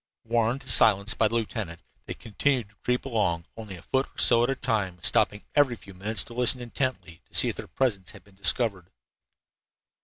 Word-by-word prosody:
Warned 115 +3 0
to - - -16
silence 110 -4 +4
by 110 - +1
the 115 - -4
lieutenant, 110 -7 -4 0.3
they - - -6
continued 120 0 -2
to 105 - -28
creep 125 +1 -1
along, 100 -10 -1
only 110 -4 -9
a 85 - -14
foot 135 +1 -1
or - - -32
so 120 -1 +6
at 120 - 0
a 135 - 0
time, 110 -9 -2
stopping 105 0 +1
every 140 -4 +2
few 100 -3 -15
minutes 105 +4 0
to 120 - -13
listen 125 +1 +2
intently 120 -8 -5
to - - -15
see - - +6
if - - -4
their - - -9
presence 100 -9 -2
had - - -14
been 100 - -23
discovered. 100 -1 0
110 Hz, 205 wpm, -26 LUFS, 100-125 Hz, 0.3 s, so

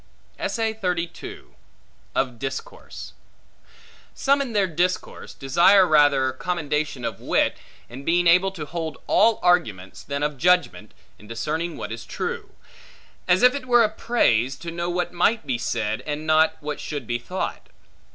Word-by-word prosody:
Of 125 -3 -1
Discourse 135 -1 -7 1.0
SOME, 280 +1 +2
in 255 -4 -4
their 205 -2 +3
discourse, 180 +1 -2
desire 175 +8 +5
rather 145 -5 +4
commendation 150 -4 -2
of - - -4
wit, - - +1 0.3
in 130 +3 -10
being 175 +3 +2
able 180 +3 +5
to 160 -5 -6
hold 160 -1 -5
all 225 +1 +4
arguments, 105 - +1
than 140 0 -4
of 150 -2 -2
judgment, 175 - +1 0.2
in 105 - -15
discerning 155 +9 -3
what 105 - -6
is 115 +1 -6
true; - - -5 0.8
as 180 +3 +3
if 250 - +7
it 280 -3 -5
were 240 -1 +5
a 215 - +2
praise, 135 - +1
to 170 +5 -7
know 170 +1 -3
what 175 0 -2
might 190 +2 +1
be 125 -4 -2
said, 110 -2 -2
and 150 +1 -3
not, 155 0 +3
what 150 0 -4
should 145 -2 -5
be 120 0 -2
thought. 180 +10 -5
155 Hz, 145 wpm, -23 LUFS, 135-180 Hz, 1.0 s, if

